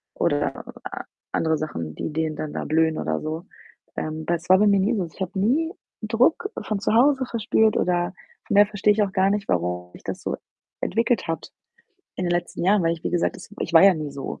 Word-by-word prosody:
oder 75 - 0 0.2
a - - -5 0.3
andere 160 -1 +1
Sachen, 85 - -5
die 150 - -4
denen 160 -1 -1
dann 155 -1 -4
da - - -3
blühen 160 0 +2
oder 80 0 -1
so. 160 +2 -4 0.5
Ähm, 155 0 -3
bei 170 - +1
das 170 0 -8
war 185 - +8
bei 210 - +5
mir 200 -1 +4
nie 215 +5 +2
so. 185 -4 -1
Ich 165 +4 -14
habe 190 +1 -3
nie 300 - +2 0.3
Druck 245 - +2
von 210 -2 -2
zu 205 - 0
Hause 265 +2 +4
verspürt 220 -2 +2
oder 175 +1 +1 0.3
von - - 0
daher 205 0 +7
verstehe 210 0 +2
ich 215 - +1
auch 195 - -2
gar 190 +1 +3
nicht, 205 -1 -2
warum 90 0 -1
sich - - -14
das - - -5
so - - -2 0.5
entwickelt 230 -2 +1
hat 165 - -4 0.7
in 185 - -2
den 175 - 0
letzten 175 0 -2
Jahren, 200 0 +4
weil 165 0 +2
ich, 170 - -7
wie - - -1
gesagt, 175 -1 0
das - - -12
ich 170 - -3
war 165 - +9
ja 195 -2 +7
nie 155 -2 -4
so. 140 -1 -6
180 Hz, 230 wpm, -24 LUFS, 160-210 Hz, 0.7 s, war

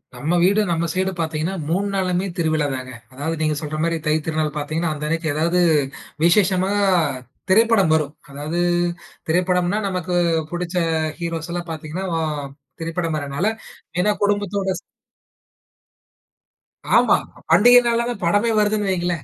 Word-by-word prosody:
நம்ம 150 +7 -2
வீடு 200 +4 +4
நம்ம 170 0 0
சைடு 190 +2 0
பாத்தீங்கன்னா 160 +2 -1 0.2
3 190 +5 0
நாளுமே 185 -1 0
திருவிழாதாங்க. 145 -6 -1 0.2
அதாவ 145 +5 -3
நீங்க 155 -1 +1
சொல்ற 155 0 -4
மாரி 170 0 +1
தை 155 - +2
திருநாள் 155 -1 -1
பார்த்தீங்கன்னா, 155 +3 -1
அந்த 150 0 -7
அன்னைக்கி 165 +1 -1
ஏதாது 170 +4 +1 0.6
விஷேஷமானா 190 +2 +3 0.7
திரைப்படம் 215 -3 +4
வரும். 150 -2 -1 0.2
அதாது 150 +5 -4 0.7
திரைப்படம்ன்னா 180 +3 +1
நமக்கு 185 -2 -3 0.4
புடிச்ச 175 +1 -4 0.4
ஹீரோஸ்ல்லாம் 170 +1 -4
பாத்தீங்கன்னா 160 +4 -5
வ - - 0 0.6
திரைப்படம் 165 -1 -2
வர்றனால 145 +4 -2 0.5
ஏன்னா 210 +4 +3
குடும்பத்தோட 205 -1 0 2.3
ஆமா. - - +5 0.3
பண்டிகை 245 +3 +8
நாள்லதான் 235 -3 -1
படமே 205 +7 +2
வருதுன்னு 210 -1 +1
வைங்களேன். 175 -4 -1
170 Hz, 120 wpm, -21 LUFS, 155-190 Hz, 2.3 s, பண்டிகை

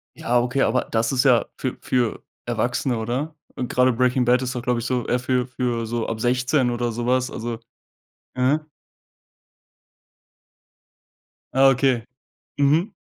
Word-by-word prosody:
Ja, 120 +1 +1
okay, 125 +3 0
aber 125 +3 +1
das 115 0 +1
ist 130 -1 +2
ja 125 -4 +4
für 130 - -3
für 120 -3 -1 0.2
Erwachsene 120 +1 -1
oder? 125 +8 -3 0.2
Und 125 - -4
gerade 125 0 +3
„Breaking 125 +1 +2
Bad“ 125 +1 +3
ist 130 0 -3
doch 125 - -3
glaube 125 -1 0
ich 115 - -5
so 125 -1 -1
eher 125 - +1
für 125 0 0
für 120 -2 -2
so 115 0 -2
ab 115 -1 -3
16 125 +2 +1
oder 120 0 -1
so 120 +1 -4
was. 130 +1 +1
Also, 115 0 -5 0.8
mhm. 130 +4 +2 2.9
Ah, 135 0 +6
okay. 130 -3 +2 0.5
Mhm. 155 +9 +3
125 Hz, 150 wpm, -23 LUFS, 120-130 Hz, 2.9 s, Ah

